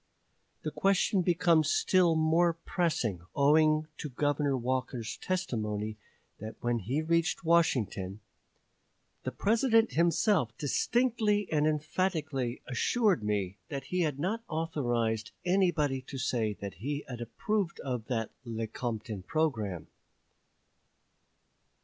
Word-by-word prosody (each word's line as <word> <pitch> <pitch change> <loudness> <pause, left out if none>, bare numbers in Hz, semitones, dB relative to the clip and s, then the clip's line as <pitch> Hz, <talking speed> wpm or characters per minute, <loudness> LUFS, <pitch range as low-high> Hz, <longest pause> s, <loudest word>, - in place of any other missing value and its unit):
The - - -2
question 195 0 +2
becomes 170 -3 +3
still 175 -2 +3
more 165 +2 +3
pressing 160 - -1
owing 155 +2 +4
to 150 - -4
Governor 145 +1 0
Walker's 125 -2 -2
testimony 110 - -2 0.4
that 110 +1 -7
when 120 -1 0
he 130 +10 -1
reached 170 +1 +1
Washington, 115 - +1 1.1
"the - - -1
President 225 +1 +3
himself 170 - +2
distinctly 215 - +1
and 150 -1 +3
emphatically 155 -5 -1
assured 195 - +1
me 100 -2 -1
that 140 -1 -4
he 180 - +1
had 150 -5 0
not 205 +10 -2
authorized 120 -9 -1
anybody 175 -8 +2
to 135 - -6
say 120 -5 0
that 100 -1 -7
he 145 +4 -3
had 120 -2 -7
approved 200 - -2
of 125 -5 -4
that 115 -3 -2
[Lecompton] 110 -2 -4
programme." 110 - -1
145 Hz, 110 wpm, -30 LUFS, 115-170 Hz, 1.1 s, owing